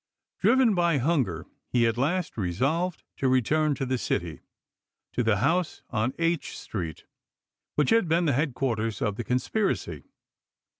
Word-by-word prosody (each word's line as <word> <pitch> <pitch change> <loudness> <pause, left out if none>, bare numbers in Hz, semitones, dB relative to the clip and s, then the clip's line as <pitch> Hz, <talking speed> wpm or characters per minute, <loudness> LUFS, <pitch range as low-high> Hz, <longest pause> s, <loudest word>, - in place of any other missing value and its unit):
Driven 255 -4 +4
by 170 -4 +2
hun 140 +1 +2
ger 85 -4 -6 0.2
he 120 -2 +3
at 115 - +2
last 160 +8 -1
resolved 135 - -1
to 135 - +1
return 145 +4 +2
to 135 - -2
the 130 -1 -1
city, 85 -7 -2 0.7
to - - 0
the 110 -3 +2
house 165 - 0
on 115 +2 0
H 165 -1 -1
street 85 -7 -6 0.7
which 150 -3 +2
had 225 -5 +4
been 165 +2 +2
the 145 - +2
headquarters 120 -6 -1
of 105 -2 -1
the 120 - -4
conspiracy. 130 - -1
135 Hz, 150 wpm, -27 LUFS, 115-165 Hz, 0.7 s, Driven